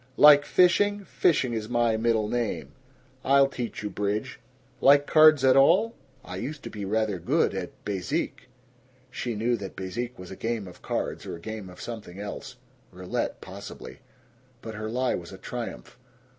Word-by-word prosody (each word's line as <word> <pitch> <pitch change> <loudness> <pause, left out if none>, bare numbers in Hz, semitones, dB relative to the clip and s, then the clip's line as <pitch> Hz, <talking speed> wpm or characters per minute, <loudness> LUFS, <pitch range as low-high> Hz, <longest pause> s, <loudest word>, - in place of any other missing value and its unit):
"Like 145 -1 +8
fishing? 205 +3 +3
Fishing 140 -11 +1
is 110 -1 -3
my 120 -2 +2
middle 110 -1 +1
name. 120 -1 -2 0.5
I'll 140 0 +5
teach 120 -5 -5
you 105 - -3
bridge. 105 +5 -2 0.4
Like 140 +1 +6
cards 155 -3 +6
at 130 -1 +6
all?" 180 +12 +5 0.3
"I 90 - -6
used 145 +8 -5
to - - -7
be 105 -2 -5
rather 105 -1 0
good - - +1
at - - -4 0.2
bezique." 100 +4 -3 0.6
She 120 -3 -3
knew 115 +3 +1
that 100 -3 -8
bezique 115 +7 -5
was 90 0 -10
a - - -6
game 115 -3 -3
of 90 - -13
cards - - -3
or - - -4
a - - -10
game 110 +1 -7
of 90 - -13
something 110 -6 -7
else. 105 0 -7 0.4
Roulette, 90 0 -3
possibly. - - -9 0.6
But 110 - -6
her 110 0 -5
lie 125 +2 0
was 85 -1 -5
a 95 - -9
triumph. 120 +3 -7
115 Hz, 170 wpm, -27 LUFS, 105-135 Hz, 0.6 s, Like